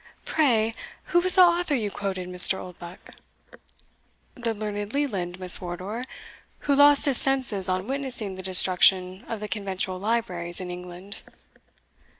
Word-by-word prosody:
"Pray, 230 -8 0 0.4
who 345 - +5
was 365 +1 +1
the 370 - +7
author 345 -3 +1
you 215 -5 -3
quoted, 190 -3 -5
Mr. 180 +1 +5
Oldbuck?" 175 -1 -12 1.2
"The 235 -3 -4
learned 205 0 -6
Leland, 190 -11 -4
Miss 185 0 +5
Wardour, 185 +7 -7 0.6
who 285 - -1
lost 285 0 +5
his 275 -4 +6
senses 250 -9 +3
on 185 +1 -2
witnessing 260 -6 -1
the 190 - -9
destruction 185 0 +2
of 225 - -6
the 210 - -5
conventual 190 -2 -5
libraries 185 -5 -3
in 180 -1 -7
England." 180 +2 -11
200 Hz, 140 wpm, -24 LUFS, 185-250 Hz, 1.2 s, the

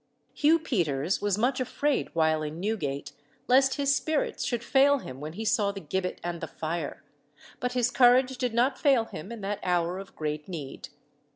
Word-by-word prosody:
Hugh 315 +2 +4
Peters 175 - -1
was 205 -1 +1
much 250 +4 +1
afraid 275 +3 0
while 160 -1 +2
in 155 +2 -5
Newgate 145 -9 -2 0.4
lest 265 +1 +4
his 280 -1 +2
spirits 310 +2 -1
should 240 -2 -2
fail 280 +3 +4
him 130 - -8
when 155 +2 -6
he 220 +5 -5
saw 210 -3 +2
the 200 - -7
gibbet 180 +3 -3
and 175 -1 -4
the - - -4
fire, 165 +2 -4 0.6
but 250 0 -2
his 245 -1 +1
courage 255 +1 +4
did 245 -3 -1
not 255 +3 +2
fail 270 -6 +4
him 195 0 -8
in 230 -2 -7
that 200 +1 -3
hour 180 0 0
of 195 - -11
great 150 -1 -3
need. 155 -7 -7
210 Hz, 185 wpm, -28 LUFS, 165-255 Hz, 0.6 s, Hugh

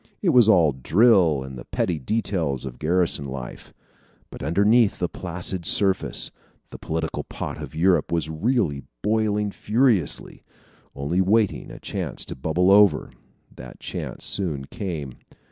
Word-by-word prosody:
It 185 - +3
was 125 -7 +6
all 85 -8 +5
drill 80 - +3
and 65 -2 -8
the - - -10
petty 85 -4 -1
details 80 - -1
of 60 -2 -8
garrison 85 -2 +1
life. 65 -2 -8 0.6
But - - -10
underneath 100 - +3
the 90 - -1
placid 90 +1 -4
surface, 95 +3 +1 0.4
the - - -9
political 80 0 -3
pot - - -6
of - - -8
Europe 85 -1 +2
was 85 -3 0
really 80 - 0 0.2
boiling 105 -1 +1
furiously 110 - 0 0.5
only 75 +7 0
waiting 105 +2 +1
a - - -9
chance - - -4
to - - -7
bubble 80 +7 +1
over. 105 0 +5 0.4
That 60 0 -11
chance - - -6
soon 80 -9 -2
came. 75 - -6
90 Hz, 140 wpm, -23 LUFS, 75-105 Hz, 0.6 s, was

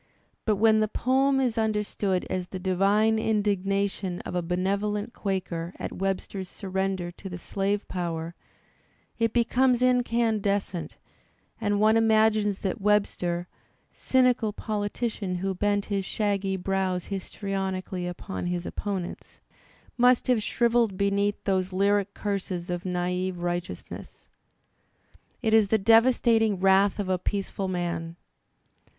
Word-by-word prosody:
But 215 - +3
when 220 +1 +4
the 215 - +2
poem 270 +4 +2
is 245 -4 +1
understood 210 -3 0
as 185 -1 -3
the 190 - -6
divine 200 +4 +2
indignation 200 -3 0
of - - -7
a 180 - 0
benevolent 200 +5 -1
Quaker 185 -3 -3
at - - -5
Webster's 195 0 -3
surrender 190 -2 -2
to 190 +2 -9
the 180 - -6
slave 200 +3 -2
power, 170 -2 -3 0.9
it 230 -1 +2
becomes 245 +1 +2
incandescent, 225 -7 +1 0.6
and 205 -1 +1
one 215 +1 +5
imagines 215 -2 +3
that 195 +2 -2
Webster, 180 -4 +1 0.4
cynical 250 -4 +2
politician 205 -2 -3
who 190 +2 -1
bent 205 +1 0
his 200 -2 -1
shaggy 195 -1 -1
brows 185 -1 -1
histrionically 190 -2 -3
upon 180 +1 -5
his 175 0 -2
opponents, 195 -4 -5 0.6
must 245 0 +5
have 245 -4 +2
shrivelled 230 -2 +1
beneath 200 +1 0
those 190 -1 0
lyric 200 +1 +1
curses 185 -4 -3
of 175 +1 -4
naive 180 0 -1
righteousness. 175 0 -5 1.1
It 220 -2 +2
is 220 -2 +6
the 220 - +3
devastating 225 -1 +4
wrath 195 +1 +4
of 205 -2 -2
a 185 -1 0
peaceful 195 0 -2
man! 170 -2 -3
200 Hz, 120 wpm, -27 LUFS, 185-215 Hz, 1.1 s, is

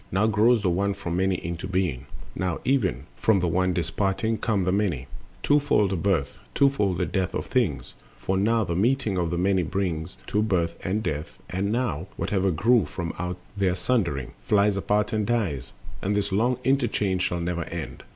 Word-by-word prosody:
Now 95 +4 +2
grows 110 +1 +4
The 95 - +3
One 100 +3 0
from 85 -4 -4
Many 95 0 +2
into 85 +2 -4
being, 90 -9 -1 0.3
now 90 -1 -2
Even 95 - +1
from 110 -3 +3
the 90 - 0
One 90 +2 +2
disparting 95 +6 -1
come 105 -5 +1
the 90 - +1
Many. 95 -10 0 0.4
Twofold 145 -9 +3
the - - +1
birth, 85 -6 0 0.2
twofold 105 -10 +3
the - - +1
death 95 -2 -1
of - - -2
things: 105 - -1 0.2
For, 95 - -1
now, 110 +4 +2
the 85 -3 -2
meeting 110 -1 +1
of 85 -2 0
the 85 - -1
Many 95 +1 +2
brings 85 -4 -2
To 105 - 0
birth 85 -6 0
and 105 +4 -1
death; 75 -4 -4
and, 95 +2 -1
now, 110 - -1
whatever 95 -1 +1
grew 110 +6 +3
From 85 -2 -4
out 90 +1 -3 0.2
their 95 -3 +1
sundering, 90 - 0
flies 100 -1 +3
apart 105 +2 0
and 110 -1 +1
dies. 95 - -1 0.3
And 100 +2 0
this 105 -1 0
long 120 +6 +2
interchange 110 -8 +1
shall 90 -1 0
never 85 -1 -2
end. 85 -1 -6
95 Hz, 185 wpm, -25 LUFS, 85-105 Hz, 0.4 s, grows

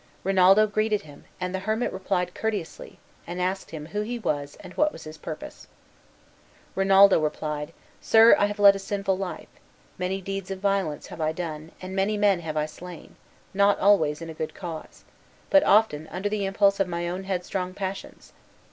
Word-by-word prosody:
Rinaldo 195 +2 +5
greeted 215 0 0
him, 145 -2 -15
and 180 0 -3
the 190 - -1
hermit 220 +5 -1
replied 180 -2 -2
courteously, 210 -6 -4 0.3
and 175 +1 -5
asked 185 +2 -2
him 155 -2 -7
who 205 +7 -3
he 240 +3 -3
was 145 -9 -3
and 185 -2 -11
what 300 0 +2
was - - -11
his 155 0 -10
purpose. 155 0 -8 1.1
Rinaldo 195 0 +6
replied, 150 -1 -3 0.3
"Sir, 225 +1 +7
I 205 - +3
have 205 0 -5
led 200 -1 +7
a - - -4
sinful 195 0 -1
life; 190 -1 -6 0.5
many 185 +1 -1
deeds 195 0 -5
of 195 - -4
violence 195 -6 -1
have - - -8
I 155 0 0
done, 160 -2 -6
and 185 +1 -6
many 200 +2 +1
men 205 -3 +3
have 160 -2 -5
I 150 - +1
slain, 170 +2 -11 0.4
not 200 +1 +3
always 165 -6 +3
in 165 - -7
a - - -8
good 155 0 -5
cause, 170 -4 -8 0.5
but 290 0 +6
often 180 -8 +3
under 195 +5 -3
the 205 -1 -1
impulse 200 0 +2
of 195 - +2
my 170 -1 -3
own 185 +2 -4
headstrong 185 0 -3
passions. 195 -1 -7
190 Hz, 185 wpm, -25 LUFS, 165-200 Hz, 1.1 s, Sir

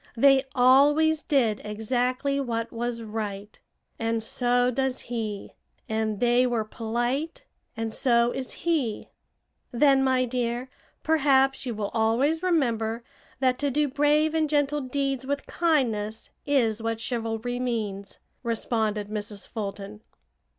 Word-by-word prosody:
They 270 +2 +5
always 290 +5 +5
did 245 -9 +1
exactly 250 +6 -1
what 230 -3 -3
was 235 0 -3
right, 210 -2 -5 0.4
and 225 0 -1
so 245 +1 +1
does 265 0 -1
he; 220 -4 -5 0.4
and 220 -2 -1
they 245 +1 +3
were 235 -3 0
polite 240 +8 -3 0.3
and 225 -1 -3
so 235 -2 +2
is 260 0 -5
he." 290 -11 0 0.6
"Then, 270 +2 +4
my 260 -1 +2
dear, 245 +1 -2 0.3
perhaps 270 -4 +3
you 235 - -3
will 205 -1 -3
always 240 +8 +2
remember 235 -10 0 0.4
that 255 -1 +2
to 285 - +1
do 295 +2 +1
brave 295 +3 +2
and 315 -2 +1
gentle 290 0 +1
deeds 270 0 -2
with 285 0 -2
kindness 230 -10 0 0.2
is 235 -6 +2
what 225 0 -2
'chivalry' 230 +1 -3
means," 210 -6 -3 0.2
responded 220 -3 -1
Mrs. 205 -2 -5
Fulton. 205 -1 -6
245 Hz, 125 wpm, -26 LUFS, 225-275 Hz, 0.6 s, They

